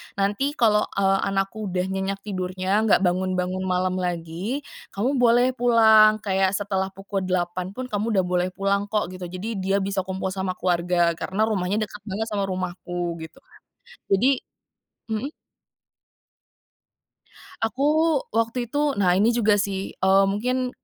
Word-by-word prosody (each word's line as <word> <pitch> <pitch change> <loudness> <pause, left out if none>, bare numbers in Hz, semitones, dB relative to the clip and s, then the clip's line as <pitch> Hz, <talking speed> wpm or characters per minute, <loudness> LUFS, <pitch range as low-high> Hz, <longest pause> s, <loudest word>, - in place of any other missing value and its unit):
"Nanti 205 +9 0
kalau, 215 -5 +3
eee, 195 0 +2
anakku 195 +2 -2
udah 180 -1 -1
nyenyak 195 +1 -3
tidurnya, 185 0 -1
nggak 205 - +4
bangun-bangun 185 +1 0
malam 185 0 0
lagi, 180 - -3 0.3
kamu 250 +7 0
boleh 245 +1 +4
pulang, 220 -3 +5
kayak, 190 -1 +1
setelah 195 -1 -1
pukul 195 +1 -4
08.00 185 +1 -2
pun, 255 0 -5
kamu 215 +1 -1
udah 190 - +3
boleh 180 0 0
pulang 200 +1 0
kok," 210 -4 -1
gitu. 185 -1 -7
Jadi, 195 +4 -5
dia 195 +1 +1
bisa 195 0 -1
kumpul 190 0 -3
sama 190 -1 -3
keluarga, 175 -1 +1
karena 195 +3 -1
rumahnya 205 +1 0
dekat 210 0 -8
banget 215 +3 -3
sama 200 -1 -1
rumahku, 175 -2 -4
gitu 160 0 -10
kan. - - -21 0.5
Jadi 200 +7 +4 0.8
mhm? 225 +6 -3 2.3
Aku, 295 +6 +2
waktu 230 +2 -1
itu. 290 - -3 0.2
Nah, 180 -1 +3
ini 220 +4 +3
juga 220 -3 +3
sih, 195 -1 -2
eee, 190 +1 +4
mungkin, 250 +5 -1
195 Hz, 145 wpm, -24 LUFS, 185-220 Hz, 2.3 s, pulang